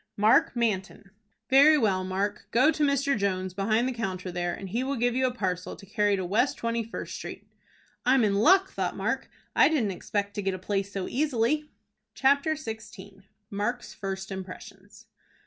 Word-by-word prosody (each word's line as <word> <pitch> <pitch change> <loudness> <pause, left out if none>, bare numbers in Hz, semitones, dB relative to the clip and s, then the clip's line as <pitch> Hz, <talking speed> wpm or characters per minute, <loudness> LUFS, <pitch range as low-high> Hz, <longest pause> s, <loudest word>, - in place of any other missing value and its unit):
"Mark 215 +4 +4
Manton." 200 -4 -2 0.4
"Very 285 +3 +7
well, 195 -8 +1
Mark. 195 +2 -3
Go 255 +7 +4
to 305 - -1
Mr. 280 -1 +2
Jones, 190 -3 -1
behind 215 +5 +1
the - - -1
counter 190 -5 -4
there, 175 0 -2
and 195 +1 -7
he 235 +7 -1
will 275 +1 -2
give 245 0 +1
you 260 0 +2
a - - -1
parcel 185 -6 -3
to - - -14
carry 205 +1 +1
to 190 -2 -3
West 215 +9 +1
Twenty 230 0 -1
First 225 - -7
Street." - - -8 0.6
"I'm 255 0 +4
in 205 -2 +2
luck," 375 - +4
thought - - -3
Mark. - - -2 0.3
"I - - +6
didn't 250 -11 +1
expect 200 +2 -3
to 205 - -3
get 195 -1 -1
a - - -5
place 195 +1 -2
so 195 -2 -3
easily." 295 +2 0 0.5
CHAPTER 280 +3 +3
XVI. 220 -7 -9 0.3
MARK'S 235 +5 -3
FIRST 195 0 -5
IMPRESSIONS. 195 +2 -9
210 Hz, 180 wpm, -27 LUFS, 195-255 Hz, 0.6 s, Very